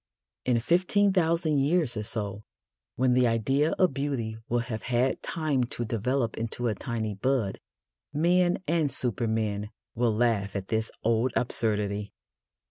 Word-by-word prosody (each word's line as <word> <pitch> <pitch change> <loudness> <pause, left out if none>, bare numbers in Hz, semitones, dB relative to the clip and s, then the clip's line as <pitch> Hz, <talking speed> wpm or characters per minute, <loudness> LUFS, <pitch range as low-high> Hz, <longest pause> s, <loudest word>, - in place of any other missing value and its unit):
In 125 -2 +3
fifteen 185 - +3
thousand 165 -4 +2
years 150 -2 +1
or 105 - -2
so, 105 -1 -3 0.5
when 130 0 +3
the 125 0 +4
idea 135 +7 +1
of 185 -6 +2
beauty 135 -6 -2
will 120 0 +1
have 110 -3 -4
had 125 +1 0
time 155 -6 0
to 120 0 -4
develop 115 +2 -1
into 115 +2 -2
a 110 - +1
tiny 110 -1 -3
bud, 110 -1 0 0.5
men 175 +4 +3
and 160 -3 +1
supermen 110 -4 0 0.2
will 120 0 +1
laugh 110 -4 +1
at 95 -1 -4
this 110 0 0
old 115 +3 +2
absurdity. 105 -3 -1
120 Hz, 140 wpm, -28 LUFS, 110-145 Hz, 0.5 s, the